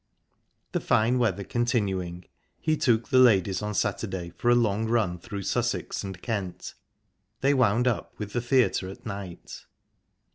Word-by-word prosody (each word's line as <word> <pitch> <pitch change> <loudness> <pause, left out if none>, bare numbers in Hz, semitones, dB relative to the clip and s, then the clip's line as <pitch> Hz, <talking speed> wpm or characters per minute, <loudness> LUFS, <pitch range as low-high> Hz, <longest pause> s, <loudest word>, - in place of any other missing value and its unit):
The - - 0
fine 120 +4 +2
weather 100 -5 +1
continuing, 95 -7 -1 0.3
he 155 - +1
took 120 -6 +1
the 130 -2 +5
ladies 100 -7 +4
on 105 -1 -3
Saturday 95 -4 -2
for 90 +8 -1
a 120 - +6
long 110 -2 +1
run 105 -7 +1
through 100 0 -6
Sussex - - -1
and 95 -2 -6
Kent. 100 -5 -4 0.7
They 140 +1 +4
wound 125 -2 +3
up 120 - -2
with 105 -1 -6
the 120 - 0
theatre 120 -6 +2
at 95 - -11
night. 100 -5 -7
105 Hz, 150 wpm, -27 LUFS, 95-120 Hz, 0.7 s, a